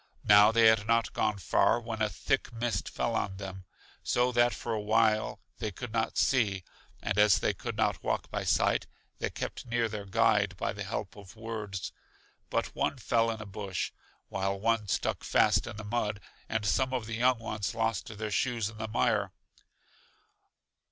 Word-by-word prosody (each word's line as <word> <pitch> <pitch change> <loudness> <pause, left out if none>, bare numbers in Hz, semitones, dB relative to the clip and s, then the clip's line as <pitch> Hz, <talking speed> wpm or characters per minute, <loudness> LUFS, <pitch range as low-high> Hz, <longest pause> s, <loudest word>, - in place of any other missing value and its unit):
Now 105 +1 +7
they 115 0 +5
had 110 -1 +5
not 115 0 +2
gone 105 -1 0
far, 100 +5 +2
when 115 -2 -5
a 105 - +2
thick 135 +2 -1
mist 115 0 -2
fell 120 - -1
on 100 -3 -2
them, 95 -1 -7 0.4
so 125 +1 +1
that 120 0 +4
for 115 - -4
a 110 - -1
while 110 0 +2 0.2
they 110 - -2
could 110 +3 -7
not 115 -1 -1
see; 105 -8 +2 0.4
and 105 - 0
as 105 -2 +6
they - - 0
could - - -6
not - - +1
walk - - -2
by - - -2
sight, - - +2 0.3
they - - -1
kept - - -6
near 120 -1 +1
their 105 -2 -6
guide 95 - +2
by - - -2
the - - -5
help - - -4
of 100 +1 -13
words. 110 -4 -5 0.6
But - - -1
one - - 0
fell 115 -1 +1
in 110 -1 -4
a - - -12
bush, 100 -2 -4 0.4
while 95 0 -2
one 115 0 +1
stuck 85 - -1
fast - - +3
in - - -6
the 110 - -6
mud, 105 -1 -1 0.3
and 110 -1 -1
some 130 +5 +1
of 120 -4 -2
the 110 0 -4
young 125 +1 +3
ones 110 -1 -4
lost 115 -3 -1
their 110 0 -4
shoes 115 -1 0
in 110 - -13
the 110 - -3
mire. 110 - +1
110 Hz, 185 wpm, -30 LUFS, 105-115 Hz, 0.6 s, Now